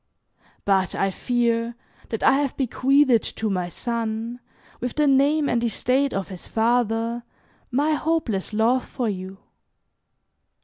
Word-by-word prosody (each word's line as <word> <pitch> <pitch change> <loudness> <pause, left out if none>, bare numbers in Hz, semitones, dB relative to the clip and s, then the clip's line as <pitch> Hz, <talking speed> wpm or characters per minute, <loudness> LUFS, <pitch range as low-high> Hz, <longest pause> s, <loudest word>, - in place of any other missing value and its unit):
But 190 -2 +2
I 195 0 +1
fear 235 +1 0 0.3
that 225 - -3
I - - +6
have 275 0 0
bequeathed 265 -1 +3 0.2
to 220 -2 -1
my 180 -2 -1
son, 230 +2 -3 0.4
with 245 0 -4
the 300 - +3
name 285 +2 +3
and 235 -2 +1
estate 255 +4 +1
of 195 0 -3
his 185 -2 -7
father, 230 0 +1 0.5
my 285 +5 +1
hopeless 305 - -1
love 230 +4 +2
for 245 - -3
you. 190 -1 -6
235 Hz, 130 wpm, -24 LUFS, 220-265 Hz, 0.5 s, I